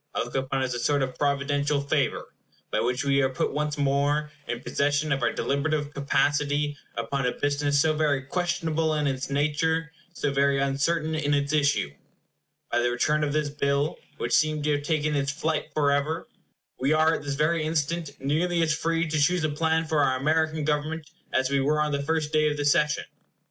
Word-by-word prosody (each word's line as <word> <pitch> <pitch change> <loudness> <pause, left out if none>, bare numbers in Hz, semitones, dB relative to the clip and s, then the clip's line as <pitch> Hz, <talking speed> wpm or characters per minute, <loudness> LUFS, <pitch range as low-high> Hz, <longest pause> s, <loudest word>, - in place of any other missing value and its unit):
I - - +1
look - - -10
upon 135 0 -1
it - - +2
as 125 - -3
a 120 - -3
sort 140 +3 +1
of 130 -1 -3
providential 145 0 0
favor, 140 -1 -1 0.4
by - - +1
which 125 +3 0
we 140 0 +3
are 130 - +2
put 130 - -2
once 150 0 -1
more 145 +2 +1 0.2
in 120 - -3
possession 145 +2 0
of 135 0 +1
our 120 - +2
deliberative 145 +1 -1
capacity 145 +1 +1 0.2
upon 125 +3 -1
a 125 - 0
business 145 0 0
so 155 +2 +3
very 145 -3 +1
questionable 165 0 -1
in 150 -1 0
its 135 -1 -2
nature, 150 +3 0 0.2
so 145 -4 -2
very 140 0 +3
uncertain 145 +4 0
in 145 -2 +1
its 140 +1 0
issue. 145 - +2 0.8
By 120 - +2
the 120 0 +2
return 150 +5 +1
of 145 - 0
this 150 -1 0
bill, 140 +1 0 0.2
which - - -2
seemed 155 -1 +2
to 150 - +1
have 145 -1 +1
taken 150 0 0
its 140 0 0
flight 160 +1 -2
forever, 145 +2 +1 0.5
we 135 +4 +2
are 155 +1 +4
at - - -2
this 145 -1 -3
very 155 +3 +1
instant 160 +1 -1
nearly 165 +5 +1
as 155 -2 +2
free 165 +2 0
to 155 0 -1
choose 175 +3 +2
a 155 - +1
plan 160 +2 +1
for 155 -1 0
our 130 -2 +2
American 155 +2 +1
Government 155 +1 -1 0.2
as 130 +1 +1
we 140 - +2
were 150 +3 +1
on 150 0 +1
the 140 0 -1
first 155 +1 -1
day 155 0 +3
of 150 - -3
the 145 - -1
session. 150 +1 +2
145 Hz, 200 wpm, -26 LUFS, 140-155 Hz, 0.8 s, are